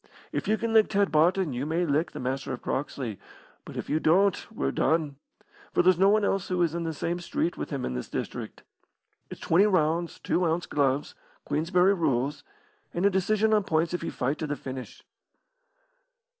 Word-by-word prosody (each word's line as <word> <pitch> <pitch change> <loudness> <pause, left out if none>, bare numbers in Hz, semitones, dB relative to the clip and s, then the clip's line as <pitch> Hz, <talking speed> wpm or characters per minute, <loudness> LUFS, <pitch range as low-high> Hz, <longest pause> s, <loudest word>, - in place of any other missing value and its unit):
If - - -3
you 220 - +2
can 230 0 -2
lick 220 -1 +6
Ted 200 -1 +1
Barton 165 +1 +3
you 130 +4 -3
may 170 +3 0
lick 155 +2 +1
the - - -8
Master 130 +1 -3
of 125 - -6
Croxley, 130 -6 -3 0.5
but - - -9
if - - -4
you 155 - +1
don't 190 +5 +3
we're 70 0 -1
done, 155 -4 0 0.6
for - - +4
there's 180 -1 +4
no 195 +1 +6
one 210 0 +3
else 195 -2 0
who 180 -1 +1
is 165 -2 0
in 170 0 -3
the 165 - -1
same 170 +4 -2
street 175 0 -2
with - - -5
him 140 -3 -3
in 65 - -3
this 60 - -5
district. - - -5 0.7
It's - - -9
twenty 190 +6 +4
rounds, 170 -2 +1
two 180 - 0
ounce 170 +1 0
gloves, 140 -1 0 0.3
Queensberry 180 +6 +2
rules, 145 -4 0 0.5
and 175 +3 +1
a 200 - +5
decision 215 +3 +2
on 210 -1 +3
points 165 -1 0
if 175 - -2
you - - -2
fight 135 +4 -2
to 155 - -2
the 145 - -2
finish." 130 -2 -8
165 Hz, 200 wpm, -27 LUFS, 145-185 Hz, 0.7 s, lick